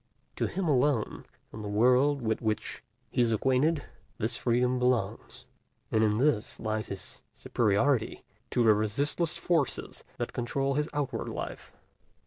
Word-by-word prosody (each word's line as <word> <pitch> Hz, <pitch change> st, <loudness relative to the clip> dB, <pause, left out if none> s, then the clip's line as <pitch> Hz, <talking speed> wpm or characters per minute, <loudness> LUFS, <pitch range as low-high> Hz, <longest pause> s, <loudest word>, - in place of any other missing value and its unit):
To -, -, +1 dB
him 190 Hz, -2 st, -2 dB
alone, 140 Hz, -4 st, +1 dB, 0.3 s
in 110 Hz, -, -7 dB
the 105 Hz, -, -5 dB
world 125 Hz, +6 st, +3 dB
with 110 Hz, -1 st, 0 dB
which 110 Hz, -2 st, -2 dB, 0.3 s
he -, -, +1 dB
is 115 Hz, -1 st, +3 dB
acquainted, 135 Hz, +7 st, +2 dB, 0.3 s
this 115 Hz, +1 st, -1 dB
freedom 125 Hz, +1 st, +1 dB
belongs; 125 Hz, -1 st, -1 dB, 0.5 s
and 110 Hz, 0 st, +3 dB
in 105 Hz, -1 st, +2 dB
this 130 Hz, -4 st, +1 dB
lies 110 Hz, -1 st, -2 dB
his 100 Hz, -1 st, -6 dB
superiority 115 Hz, +3 st, +1 dB, 0.3 s
to 120 Hz, -, +2 dB
the 110 Hz, -2 st, +7 dB
resistless 140 Hz, -, +1 dB
forces 165 Hz, -7 st, -1 dB
that -, -, -3 dB
control 135 Hz, +3 st, -1 dB
his 150 Hz, +3 st, 0 dB
outward 135 Hz, -5 st, -2 dB
life. -, -, -6 dB
125 Hz, 140 wpm, -29 LUFS, 110-140 Hz, 0.5 s, the